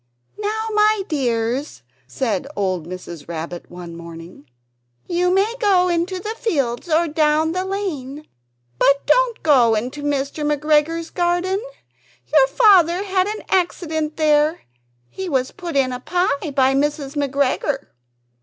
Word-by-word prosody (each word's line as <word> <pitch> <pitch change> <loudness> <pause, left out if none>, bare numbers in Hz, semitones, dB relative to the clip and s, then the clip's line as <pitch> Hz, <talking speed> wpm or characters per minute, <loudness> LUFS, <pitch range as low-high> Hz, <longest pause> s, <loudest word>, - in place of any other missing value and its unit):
"Now, 435 +1 -2
my 425 -1 +3
dears," 245 - -2 0.2
said 215 - -2
old 185 -5 -1
Mrs. 175 -4 -8
Rabbit, 170 +1 -6
one 175 -1 -9
morning, 165 -3 -11 0.6
"you 355 +1 +1
may 395 +4 +2
go 380 -5 +3
into 350 +2 -1
the 425 +4 -4
fields 280 - -1
or 330 +2 +3
down 310 +1 +2
the 365 +2 -1
lane, 305 -8 -4 0.5
but 280 0 +3
don't - - +2
go 250 -7 +5
into 250 +7 -3
Mr. 285 +1 -2
McGregor's 300 +2 +1
garden: 355 +3 0 0.7
your 280 -4 +6
Father 365 - +4
had 380 -1 +1
an 430 +1 -5
accident 320 -4 -1
there; 305 +1 +2 0.5
he 380 - -6
was 260 -3 0
put 345 -5 -7
in 265 -2 +2
a 250 - -4
pie 335 0 -1
by 270 -1 +2
Mrs. 290 0 -1
McGregor." 280 0 0
300 Hz, 135 wpm, -20 LUFS, 260-360 Hz, 0.7 s, your